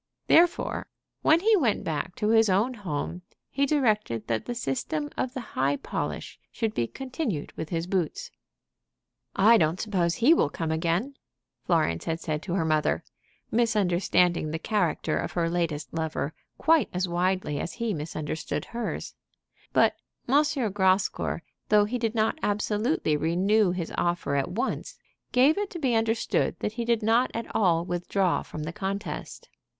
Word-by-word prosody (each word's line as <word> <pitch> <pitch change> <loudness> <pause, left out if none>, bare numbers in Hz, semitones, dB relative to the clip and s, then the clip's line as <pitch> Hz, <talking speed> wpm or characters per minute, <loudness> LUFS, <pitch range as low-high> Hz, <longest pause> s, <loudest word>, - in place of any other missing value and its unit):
Therefore, 340 +1 +3 0.3
when 320 +2 +4
he 440 +2 +5
went 250 - +1
back 160 +2 -3
to 210 0 0
his 225 -1 +5
own 205 +7 +2
home 180 -4 -4 0.3
he 280 0 +1
directed 215 - +1
that 115 -1 -2
the 245 - -3
system 290 +4 -2
of 255 0 -2
the - - -2
high 135 +2 +1
polish - - -5
should 225 -3 -2
be 120 - 0
continued 255 - -4
with 160 - -5
his 165 -1 -2
boots. 180 -3 -2 1.0
"I 225 +4 +6
don't 165 +2 +1
suppose 180 -5 0
he 250 +7 +5
will 240 - +2
come 160 +1 -3
again," 170 - -1 0.5
Florence 155 - +1
had 165 0 -2
said 155 -2 -3
to 175 0 -3
her 175 -4 +1
mother, 155 -1 +1 0.5
misunderstanding 180 -7 +2
the 160 - -2
character 195 -1 0
of - - -4
her 170 -1 +1
latest 165 -3 -2
lover 160 -2 -2 0.2
quite 320 -2 +3
as 180 +1 -1
widely 175 -3 0
as - - -4
he 230 -3 -2
misunderstood 155 -1 -4
hers. 235 0 -4 0.6
But - - +4 0.3
M. 250 - -1 0.4
Grascour, 190 -3 +1 0.3
though 210 -1 +5
he 245 +4 -2
did 230 -1 -1
not 220 +7 +1
absolutely 210 - 0
renew 185 +7 +2
his 175 -2 -3
offer 175 -4 0
at 140 -1 0
once, 215 +7 -3 0.3
gave 275 +8 +4
it 410 -1 -2
to - - -7
be 265 -7 +1
understood 225 0 +1
that 210 - -3
he 235 0 -3
did 235 -1 +1
not 230 +4 +3
at 230 - -2
all 170 -5 +3
withdraw 175 +1 0
from 155 - -7
the 160 +2 -5
contest. 195 -4 -5
190 Hz, 160 wpm, -27 LUFS, 165-230 Hz, 1.0 s, I